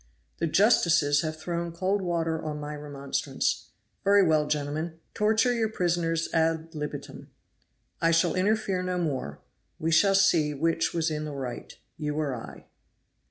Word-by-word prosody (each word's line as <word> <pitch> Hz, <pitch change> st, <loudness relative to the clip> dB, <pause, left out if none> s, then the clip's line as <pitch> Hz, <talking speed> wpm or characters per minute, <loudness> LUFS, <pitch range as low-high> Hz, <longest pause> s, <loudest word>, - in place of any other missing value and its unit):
"The 165 Hz, -, +1 dB
justices 165 Hz, -6 st, +4 dB
have 155 Hz, -1 st, -3 dB
thrown 170 Hz, +1 st, -3 dB
cold 190 Hz, +4 st, 0 dB
water 165 Hz, -3 st, -1 dB
on 150 Hz, -1 st, -4 dB
my 150 Hz, 0 st, -5 dB
remonstrance 145 Hz, -2 st, -2 dB, 0.3 s
very 200 Hz, 0 st, +5 dB
well, 155 Hz, -2 st, +3 dB
gentlemen, 150 Hz, +3 st, -2 dB
torture 220 Hz, +3 st, +2 dB
your 225 Hz, -2 st, 0 dB
prisoners 170 Hz, -4 st, 0 dB
ad 160 Hz, 0 st, +1 dB
libitum; 150 Hz, -1 st, -6 dB, 0.7 s
I 165 Hz, -, +4 dB
shall 165 Hz, 0 st, +3 dB
interfere 195 Hz, -1 st, +1 dB
no 180 Hz, 0 st, -2 dB
more; 135 Hz, -, -3 dB, 0.4 s
we 165 Hz, +1 st, -1 dB
shall 195 Hz, +5 st, +5 dB
see 165 Hz, -6 st, +3 dB
which 165 Hz, +3 st, +1 dB
was 160 Hz, -1 st, 0 dB
in 155 Hz, 0 st, -3 dB
the 150 Hz, -2 st, -6 dB
right, 130 Hz, -3 st, -6 dB, 0.2 s
you 150 Hz, -1 st, -3 dB
or 150 Hz, -3 st, -1 dB
I." 115 Hz, -, -10 dB
165 Hz, 150 wpm, -27 LUFS, 150-180 Hz, 0.7 s, very